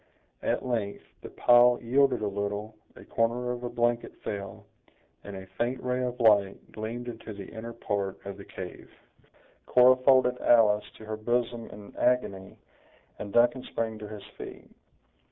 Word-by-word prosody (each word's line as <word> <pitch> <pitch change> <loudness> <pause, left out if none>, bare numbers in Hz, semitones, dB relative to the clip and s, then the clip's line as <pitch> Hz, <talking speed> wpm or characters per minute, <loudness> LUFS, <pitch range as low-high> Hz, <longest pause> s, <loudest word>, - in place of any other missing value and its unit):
At - - -1
length, 110 -5 -2 0.2
the - - -8
pile 120 0 +5
yielded 130 0 +2
a - - +1
little, 100 +2 -3 0.2
a - - -13
corner 120 +2 0
of 120 0 -4
a 120 - -3
blanket 120 0 -1
fell, 100 -1 -6 0.6
and 100 - -8
a 95 0 -8
faint 125 +2 0
ray 125 0 0
of 125 0 -3
light 100 -4 +3
gleamed 115 +3 -5
into 115 -2 -7
the 100 -1 -8
inner 115 +3 -8
part 100 -4 -3
of 100 0 -6
the 100 - -10
cave. 90 -2 -9 0.8
Cora 125 +1 +6
folded 130 -1 +4
Alice 105 -3 +4
to 110 - -11
her 110 0 -4
bosom 120 +1 -1
in 105 -1 -12
agony, 110 -6 0 0.6
and 100 - -6
Duncan 120 +4 +4
sprang 110 -3 -4
to 105 - -7
his 105 -1 -9 0.2
feet. - - -9
115 Hz, 160 wpm, -28 LUFS, 105-125 Hz, 0.8 s, Cora